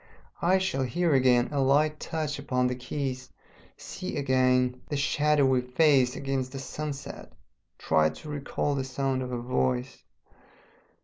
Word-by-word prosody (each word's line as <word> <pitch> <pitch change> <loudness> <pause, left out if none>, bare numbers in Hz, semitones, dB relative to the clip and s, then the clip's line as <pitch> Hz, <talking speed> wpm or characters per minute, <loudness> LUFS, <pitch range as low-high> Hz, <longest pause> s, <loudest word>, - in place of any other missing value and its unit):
I 185 +3 +4
shall 190 -8 -1
hear 165 +5 +1
again 125 -2 +4
a 140 -2 0
light 150 +3 +2
touch 155 -3 -3
upon 125 -2 0
the 125 - +1
keys, 130 0 -4 0.5
see 185 - -6
again 130 -2 +2
the 145 - -1
shadowy 140 -2 +2
face 130 0 +3
against 135 -1 -3
the - - -5
sunset, 145 +1 -6 0.5
try 80 -1 +2
to 80 - -10
recall 145 0 -2
the 135 -1 -1
sound 130 0 -2
of 125 0 -5
a 125 - -2
voice.... 125 +1 -2
135 Hz, 140 wpm, -27 LUFS, 125-145 Hz, 0.5 s, I